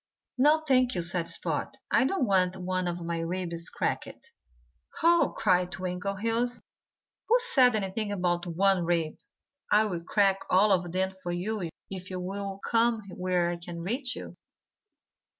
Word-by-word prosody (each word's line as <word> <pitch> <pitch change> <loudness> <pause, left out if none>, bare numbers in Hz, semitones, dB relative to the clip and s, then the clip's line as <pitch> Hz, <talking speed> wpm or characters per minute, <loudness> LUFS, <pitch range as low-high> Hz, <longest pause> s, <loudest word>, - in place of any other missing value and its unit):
"No, 305 +4 +5
thank 255 -3 +3
you!" 175 - +1
said 170 0 -1
Spot. - - -2
"I - - +4
don't 355 0 +1
want 190 -3 +2
one 185 0 -2
of 175 -1 -3
my 170 0 -2
ribs 170 0 -3
cracked." 470 - -4 0.7
"Ho!" 340 0 +4
cried 180 -3 +2
Twinkleheels. 200 +7 -2 0.7
"Who 465 - +6
said 260 - +4
anything 205 +1 -2
about 175 -3 -1
one 185 +2 +2
rib? 165 -2 -1 0.5
I'll 210 -5 +2
crack 195 +1 +2
all 200 +3 +5
of 180 -2 +1
them 190 +1 0
for 175 -1 -3
you 180 +1 -2 0.2
if 185 -1 -7
you'll 195 +2 -4
come 230 -1 +2
where 180 -1 0
I 175 - -4
can 170 0 -8
reach 245 +8 -2
you." - - -9
190 Hz, 145 wpm, -28 LUFS, 175-220 Hz, 0.7 s, Who